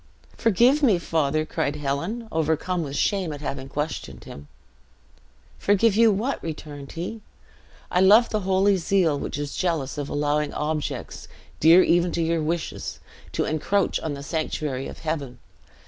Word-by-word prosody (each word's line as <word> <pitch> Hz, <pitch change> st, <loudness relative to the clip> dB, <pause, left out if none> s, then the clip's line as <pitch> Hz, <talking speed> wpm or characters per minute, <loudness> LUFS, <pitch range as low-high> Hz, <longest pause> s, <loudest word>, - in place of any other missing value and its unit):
"Forgive 240 Hz, +7 st, +3 dB
me, 225 Hz, -10 st, +4 dB
father," 155 Hz, -2 st, 0 dB
cried 145 Hz, -1 st, -2 dB
Helen, 150 Hz, +11 st, -3 dB
overcome 160 Hz, +3 st, 0 dB
with 140 Hz, -3 st, -5 dB
shame 190 Hz, +1 st, 0 dB
at 145 Hz, -1 st, -7 dB
having 135 Hz, -2 st, -5 dB
questioned 150 Hz, +2 st, -4 dB
him. 70 Hz, +1 st, -11 dB, 1.1 s
"Forgive 205 Hz, +1 st, +3 dB
you 225 Hz, 0 st, +6 dB
what?" 225 Hz, +8 st, -1 dB
returned 150 Hz, -3 st, -7 dB
he. 180 Hz, +7 st, -5 dB, 0.7 s
"I 180 Hz, -, +2 dB
love 210 Hz, +5 st, +6 dB
the 215 Hz, -, 0 dB
holy 195 Hz, +1 st, +2 dB
zeal 170 Hz, -4 st, +1 dB
which -, -, -4 dB
is 145 Hz, -1 st, -4 dB
jealous 155 Hz, -6 st, -1 dB
of 145 Hz, -, -4 dB
allowing 145 Hz, 0 st, 0 dB
objects, 150 Hz, 0 st, -3 dB, 0.3 s
dear 170 Hz, +4 st, +7 dB
even 175 Hz, 0 st, +3 dB
to 170 Hz, -, 0 dB
your 165 Hz, 0 st, 0 dB
wishes, 165 Hz, +2 st, -3 dB, 0.3 s
to -, -, 0 dB
encroach 180 Hz, +5 st, 0 dB
on 155 Hz, -3 st, -4 dB
the 140 Hz, -, -8 dB
sanctuary 150 Hz, -4 st, -3 dB
of -, -, -9 dB
heaven. 150 Hz, -5 st, -3 dB
160 Hz, 150 wpm, -24 LUFS, 145-190 Hz, 1.1 s, dear